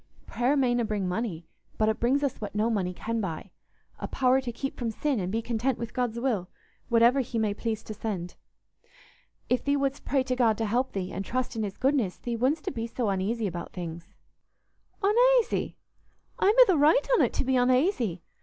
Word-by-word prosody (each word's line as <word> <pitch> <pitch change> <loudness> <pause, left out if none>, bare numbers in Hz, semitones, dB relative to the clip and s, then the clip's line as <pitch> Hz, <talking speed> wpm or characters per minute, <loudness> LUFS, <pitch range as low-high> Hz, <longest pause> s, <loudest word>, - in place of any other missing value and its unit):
Prayer 255 +4 0
mayna 245 -3 +2
bring 210 -4 -2
money, 180 -4 -3 0.3
but 215 - +2
it 220 - 0
brings 265 +5 +2
us 275 -5 -2
what 210 -1 -6
no 220 +3 +1
money 190 -5 0
can 225 +5 -3
buy—a 180 0 -8
power 260 0 +2
to 250 -2 -4
keep 270 +4 -5
from 240 -2 -3
sin 265 +3 -1
and 185 -1 -2
be 225 +2 -1
content 240 +2 -1
with 230 -1 -6
God's 240 -2 -1
will, 220 -8 -1 0.4
whatever 235 +3 +5
He 245 -2 -2
may 215 -2 +1
please 220 0 -3
to 215 - -7
send. 190 -5 -4 1.1
If 250 - +1
thee 285 0 +1
wouldst 275 0 -1
pray 270 -2 +1
to 255 -1 -1
God 230 -4 +3
to 225 - -1
help 245 +5 0
thee, 190 -1 -3
and 195 - -4
trust 255 +4 -3
in 225 - -2
His 200 -3 -4
goodness, 260 -8 +1
thee 240 -1 -4
wouldstna 265 +8 0
be 230 -2 -3
so 235 -2 -2
uneasy 205 +4 -1
about 175 -3 -5
things." 170 -1 -7 0.9
"Unaisy? 485 +3 +3 0.6
I'm 410 +3 +4
i' - - +10
th' 360 -6 +3
right 310 +12 +4
on't - - +3
to - - -1
be 265 0 0
unaisy. 250 - +2
235 Hz, 195 wpm, -27 LUFS, 210-260 Hz, 1.1 s, i